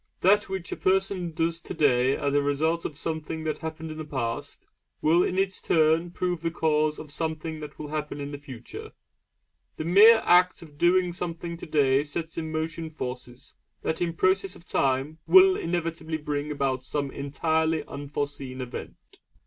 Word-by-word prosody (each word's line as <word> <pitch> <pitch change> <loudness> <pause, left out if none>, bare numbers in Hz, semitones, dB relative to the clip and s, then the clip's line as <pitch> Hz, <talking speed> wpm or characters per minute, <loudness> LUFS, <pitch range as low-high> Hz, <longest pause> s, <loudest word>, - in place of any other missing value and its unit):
That 205 +3 +4
which 190 -2 -4
a - - -1
person 190 -2 +1
does 165 +1 -1
today 130 -4 +2
as 140 - -1
a 145 - +4
result 155 +4 0
of 145 - -4
something 160 0 -4
that 155 -1 -2
happened 160 0 -6
in 155 - -7
the - - -3
past, 125 -6 -4 0.3
will 170 +3 +4
in 185 - -1
its 190 0 0
turn 160 +1 +3
prove 175 -1 -2
the 165 - 0
cause 155 -2 +1
of 150 - -9
something 160 +1 -3
that 150 -1 -9
will 150 - -7
happen 150 -1 -4
at 140 0 -5
some 145 - -6
future 130 -5 -9
date. - - -12 0.9
The 155 - -4
mere 220 +6 +7
act 180 0 +4
of 150 -3 -16
doing 180 0 +3
something 170 -1 -4
today 145 -4 +2
sets 160 +2 -5
in 160 -1 -4
motion 160 +1 -3
forces 125 -3 -7 0.3
that 160 - -2
in 170 -1 0
process 185 +2 +1
of 170 - -15
time 135 +3 0
will 380 0 +8
inevitably 165 - -2
bring 150 -1 -3
about 135 -3 -1
some 140 +1 -3
entirely 160 +3 0
unforeseen 140 -2 -5
event. 125 -1 -8
160 Hz, 175 wpm, -26 LUFS, 145-170 Hz, 0.9 s, will